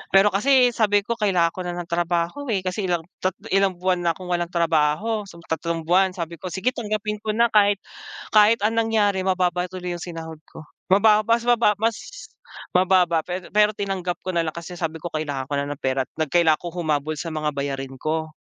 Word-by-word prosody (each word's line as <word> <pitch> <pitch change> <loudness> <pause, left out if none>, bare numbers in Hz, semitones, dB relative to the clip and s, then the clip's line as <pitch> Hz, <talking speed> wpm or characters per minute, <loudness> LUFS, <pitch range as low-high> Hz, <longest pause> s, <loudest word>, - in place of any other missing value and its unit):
pero 195 +2 +7
kasi 250 +5 +4
sabi 205 -3 +2
ko, 235 - -2
"Kailangan 180 -6 +2
ko 185 - -6
na 175 - -3
ng 175 -1 -6
trabaho, 175 - -1
eh, 195 - 0
kasi 190 +2 -2
ilang 175 -2 0 0.2
tat 185 0 0 0.2
ilang 195 -1 +3
buwan 180 0 0
na 170 - +4
akong 180 0 -9
walang 175 -1 0
trabaho," 170 +6 +1
so 170 - -13
tatlong 165 +1 -2
buwan. 185 +2 +3
Sabi 170 -1 -5
ko, - - -6
"Sige 190 +7 +1
tanggapin 215 -1 -3
ko 215 -1 -2
na," 235 0 +3
kahit 205 -1 +5 0.6
kahit 215 +1 +6
ang 215 - +2
nangyari 215 -4 +2
mababa 180 -2 +1
tuloy 180 -1 -6
yung 175 - -9
sinahod 165 -2 -7
ko. - - -12 0.3
Mababa 210 +1 +5
mas 230 +1 +2
mababa 235 -3 +3
mas 225 -1 +1 0.7
mababa, 180 -2 +3
pero 180 0 -5
pero 210 +1 +4
tinanggap 190 -3 -3
ko 185 - -3
na 170 -2 0
lang 155 - -4
kasi 170 +1 -8
sabi 160 -1 -4
ko 175 - -4
kailangan 145 -4 -4
ko 145 - -1
na 140 - -1
ng 145 0 -7
pera 130 0 0
at - - -61
nag 155 -3 -2
kailangan 165 -3 +3
ko 175 - -4
humabol 155 -3 -2
sa 165 -1 -5
mga 155 -1 -1
bayarin 135 -2 -4
ko. 160 +1 -2
180 Hz, 210 wpm, -23 LUFS, 165-205 Hz, 0.7 s, pero